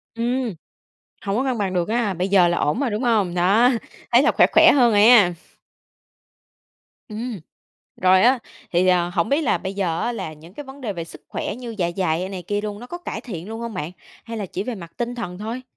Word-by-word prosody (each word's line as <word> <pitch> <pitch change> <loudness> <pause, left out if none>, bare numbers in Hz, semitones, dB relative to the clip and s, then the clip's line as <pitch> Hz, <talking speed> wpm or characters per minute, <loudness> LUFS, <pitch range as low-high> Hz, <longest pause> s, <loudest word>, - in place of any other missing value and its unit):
Ừm, 240 0 -1 0.7
hổng 200 0 -1
có 255 - 0
cân 255 -3 -1
bằng 195 -2 -1
được 175 0 0
ha. 220 -3 0
Bây 180 +2 -2
giờ 190 -3 +5
là 175 - 0
ổn 150 - 0
rồi, 275 -4 0
đúng 210 +3 -2
hông? 215 -8 +1
Đó, 200 +8 +4 0.4
thấy - - +6
là - - +3
khỏe, - - +5
khỏe - - +7
hơn 245 -5 +4
rồi 205 0 +5
a. 215 -7 +7 1.8
Ừm. 220 0 -5 0.6
Rồi 185 0 +4
á, 255 +2 +5 0.3
thì, 180 +1 +2
ờ, 175 -1 +3
hổng 175 +1 -1
biết 280 +5 +2
là 235 - +1
bây 190 +3 -5
giờ 175 -4 -1
á 240 - -1
là 190 -9 -5
những 160 +4 -15
cái 295 - -8
vấn 270 +1 -12
đề 230 -6 -3
về 170 -3 -5
sức 165 - -13
khỏe - - -4
như 240 -2 -7
dạ 175 -2 0
dày, 175 -3 0
ơ, 185 - -4
này 190 -2 -6
kia 205 +4 -2
luôn, 205 -1 -5
nó 245 - -9
có 350 +7 -7
cải 350 - -6
thiện 185 -6 -8
luôn 225 +1 -6
hông 235 -2 -5
bạn? 165 -3 -4 0.3
Hay 230 -1 -6
là 205 -3 -4
chỉ 185 - -4
về 245 +3 -4
mặt 170 -5 -10
tinh 240 0 -3
thần 180 -7 -6
thôi? 225 +5 -5
205 Hz, 240 wpm, -22 LUFS, 180-240 Hz, 1.8 s, khỏe